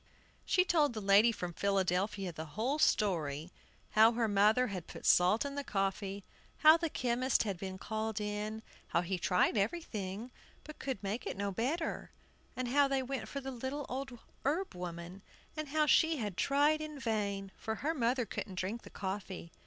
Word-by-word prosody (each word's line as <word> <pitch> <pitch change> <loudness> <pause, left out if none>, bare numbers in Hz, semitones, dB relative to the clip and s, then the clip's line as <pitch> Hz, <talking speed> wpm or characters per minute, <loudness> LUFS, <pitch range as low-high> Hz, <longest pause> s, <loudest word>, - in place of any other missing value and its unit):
She 365 -1 +3
told 305 -7 +3
the 220 - -4
lady 205 +3 +5
from 180 -5 -5
Philadelphia 195 0 0
the 160 0 -6
whole 265 +7 0
story, 165 - +1 0.4
how 220 +2 +6
her 230 -1 +1
mother 210 +4 +4
had 185 -4 -5
put - - -9
salt 185 +8 +5
in 280 - -3
the 285 0 -3
coffee; 195 -2 -2 0.4
how 310 +1 +11
the 335 -1 -1
chemist 255 -1 +1
had 200 -5 -3
been 190 0 -5
called 220 +2 -3
in; 210 +1 -3 0.2
how 170 - +1
he 180 +1 -2
tried 180 +4 +2
everything 210 - -2 0.3
but 305 - -11
could 260 -7 -4
make 205 +5 -3
it - - -4
no 200 0 -1
better; 275 - -2 0.5
and 255 -1 -2
how 285 +2 +4
they 270 -1 0
went 265 +1 -4
for 280 - -5
the 270 0 -5
little 265 +3 -4
old 260 -1 -4 0.3
herb 330 +8 0
woman, 175 +1 -7 0.3
and 310 -1 -4
how 305 +2 +2
she 320 +2 +4
had 210 -7 -3
tried 290 +7 +3
in 305 -1 -6
vain, 200 -4 -2
for 220 - -4
her 305 +7 -1
mother 245 -3 +1
couldn't 195 -3 -5
drink 195 +6 -3
the - - -12
coffee. 190 -3 -5
220 Hz, 180 wpm, -33 LUFS, 195-270 Hz, 0.5 s, how